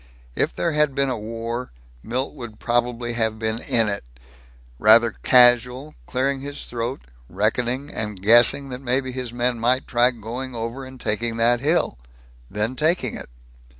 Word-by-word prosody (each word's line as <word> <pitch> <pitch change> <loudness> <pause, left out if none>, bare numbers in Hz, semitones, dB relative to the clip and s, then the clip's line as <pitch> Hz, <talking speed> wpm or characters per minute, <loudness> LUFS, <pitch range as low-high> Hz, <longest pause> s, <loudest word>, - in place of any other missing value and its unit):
If - - -1
there 170 - 0
had 150 -2 +1
been 140 -1 +2
a 125 - -2
war, 115 +3 -5 0.3
Milt 125 - -3
would 120 -6 -9
probably 120 0 -1
have 110 -2 -1
been 110 0 -2
in 115 -2 +2
it 100 -1 -2 0.8
rather 115 +2 +6
casual, 125 +3 +4
clearing 135 +1 -1
his 145 +1 -6
throat, 120 +2 -4 0.3
reckoning 120 +8 -1
and 105 -3 -4
guessing 120 +7 +5
that 125 0 -7
maybe 130 0 -1
his 125 -2 -5
men 120 0 -1
might 125 +3 +1
try 120 +1 +3
going 120 +2 -6
over 115 +4 -5
and 130 0 -12
taking 115 +1 -1
that 120 +1 +3
hill... 145 - 0 0.5
then 105 +5 -2
taking 160 +5 +1
it. - - -9
120 Hz, 155 wpm, -22 LUFS, 115-130 Hz, 0.8 s, rather